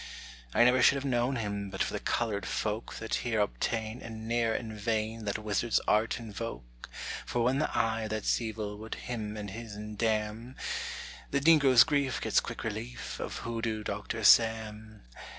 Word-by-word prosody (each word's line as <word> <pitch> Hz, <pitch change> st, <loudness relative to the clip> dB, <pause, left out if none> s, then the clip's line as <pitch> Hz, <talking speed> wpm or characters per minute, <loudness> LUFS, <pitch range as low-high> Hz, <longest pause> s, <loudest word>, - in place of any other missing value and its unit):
_ -, -, +2 dB
I -, -, +9 dB
never 125 Hz, +1 st, +5 dB
should -, -, +7 dB
have 140 Hz, 0 st, -3 dB
known 125 Hz, 0 st, +1 dB
him 100 Hz, -3 st, -3 dB
But -, -, -1 dB
for -, -, -3 dB
the -, -, -1 dB
colored 105 Hz, -4 st, -1 dB
folk 110 Hz, +1 st, -2 dB
That 115 Hz, -, -5 dB
here 115 Hz, -3 st, 0 dB
obtain 110 Hz, -, -1 dB
And 110 Hz, -1 st, -7 dB
ne'er 115 Hz, -1 st, +1 dB
in 110 Hz, -2 st, -4 dB
vain 110 Hz, +1 st, -2 dB
That 100 Hz, 0 st, -1 dB
wizard's 110 Hz, +2 st, +1 dB
art 110 Hz, +3 st, +2 dB
invoke; 100 Hz, -, -7 dB, 0.3 s
For 120 Hz, -, -1 dB
when 130 Hz, +3 st, +2 dB
the 155 Hz, -, +1 dB
Eye 115 Hz, -1 st, +1 dB
that's 110 Hz, +2 st, 0 dB
Evil 105 Hz, -2 st, -4 dB
Would 110 Hz, +1 st, -6 dB
him 110 Hz, -3 st, -5 dB
and 105 Hz, -2 st, -5 dB
his'n 105 Hz, -1 st, -7 dB
damn, 110 Hz, +2 st, -1 dB, 0.7 s
The 140 Hz, -, +1 dB
negro's 140 Hz, -5 st, +7 dB
grief 145 Hz, -4 st, 0 dB
gets -, -, +3 dB
quick -, -, -6 dB
relief 115 Hz, +2 st, -5 dB
Of -, -, -4 dB
Hoodoo 115 Hz, -2 st, -2 dB
Doctor 105 Hz, +2 st, -4 dB
Sam. 110 Hz, -1 st, +4 dB
110 Hz, 170 wpm, -30 LUFS, 105-120 Hz, 0.7 s, I